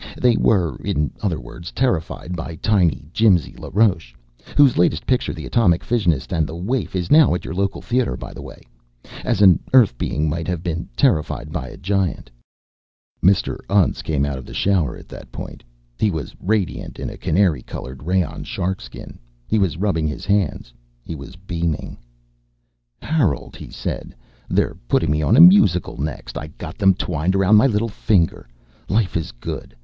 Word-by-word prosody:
They 125 -2 +4
were, 95 -9 +2
in 75 +1 -1
other 90 -8 -1
words, 75 +8 -10
terrified 90 -7 -1
by 80 -1 -6
tiny 85 -6 +1
Jimsy 95 - +3
LaRoche 90 - 0 0.4
whose 140 -4 +6
latest 85 -2 +2
picture, 125 -1 +1
'The - - -7
Atomic 90 -8 +2
Fissionist 90 - 0
and 80 -2 +1
the 80 - -7
Waif,' 100 +6 -2
is 90 -2 -2
now 150 - +6
at - - -5
your - - -5
local 100 +2 -2
theatre, 125 0 0
by - - -8
the - - -9
way - - -11 0.6
as 110 -5 +1
an 90 -5 +7
Earth 120 - +6
being 75 +3 -1
might 80 +2 -2
have 90 -2 -3
been 85 -2 -3
terrified 75 - +1
by 65 - -4
a - - -10
giant!" 95 -9 -2 0.9
Mr. 95 +1 +2
Untz 100 -3 +2
came 70 -3 0
out 70 -2 -3
of 65 - -10
the - - -9
shower 90 -9 +1
at - - -14
that - - -11
point. - - -8 0.4
He 110 - +3
was 80 -6 -4
radiant 100 -3 -2
in - - -5
a - - -9
canary 85 -6 +1
colored 65 +1 -8
rayon 90 +1 -1
sharkskin. 90 -9 -5 0.3
He 110 - +1
was 95 -6 0
rubbing 90 -5 0
his 75 - -5
hands. 100 -11 0 0.3
He - - -6
was 70 +2 -9
beaming. 85 -4 -3 1.1
"Harold," 140 - 0
he - - -10
said, - - -5 0.3
"they're - - 0
putting - - +2
me 75 +1 +1
on 110 +10 +3
a - - +9
musical 170 - +6
next. 75 +1 -5
I 75 - -7
got 80 - -10
them 95 -1 +5
twined 85 +1 -1
around 95 +2 +4
my 125 - +6
little 115 -2 0
finger. 95 - 0 0.4
Life 105 -2 +1
is 80 -2 -2
good. - - -7
90 Hz, 175 wpm, -21 LUFS, 80-105 Hz, 1.1 s, a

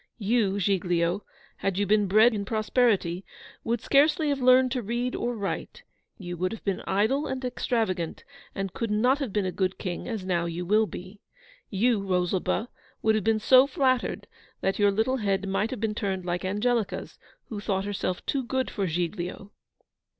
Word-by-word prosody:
YOU, 210 -2 +1
Giglio, 180 -1 +1 0.3
had 195 -2 -1
you 205 - +2
been 205 0 +3
bred 215 +5 +5
in 205 -2 -2
prosperity, 215 -4 +1 0.4
would 230 0 -1
scarcely 300 +4 +3
have 280 -2 -1
learned 255 0 +5
to 255 -1 -1
read 240 +3 -2
or 240 0 -2
write 200 -3 -4 0.3
you 175 -2 -6
would 185 +2 -1
have 225 - -7
been 195 -2 -1
idle 220 +9 +1
and 260 -1 -4
extravagant, 220 -9 -1 0.3
and 195 -2 -3
could 230 - -3
not 245 +7 +3
have 270 -7 -3
been 205 -1 0
a 185 - -1
good 185 0 -1
King 180 -3 -4
as 220 -6 -4
now 175 -2 0
you 170 +1 -4
will 215 +4 +3
be. 190 +3 -9 0.5
You, 220 +2 +2
Rosalba, 185 +4 0 0.3
would 220 - +4
have 215 -2 0
been 225 +1 +3
so 255 +4 +6
flattered, 260 -2 0 0.4
that 195 +2 0
your 205 0 +5
little 220 +6 +1
head 200 -3 0
might 200 +3 0
have 255 - -5
been 220 -1 -1
turned 190 -4 -2
like 175 +1 -2
Angelica's, 210 +3 -1 0.3
who 215 - -4
thought 195 -2 -1
herself 195 -3 -3
too 275 - 0
good 260 +1 -2
for 195 -2 -1
Giglio. 180 +3 -3
205 Hz, 180 wpm, -27 LUFS, 190-240 Hz, 0.5 s, so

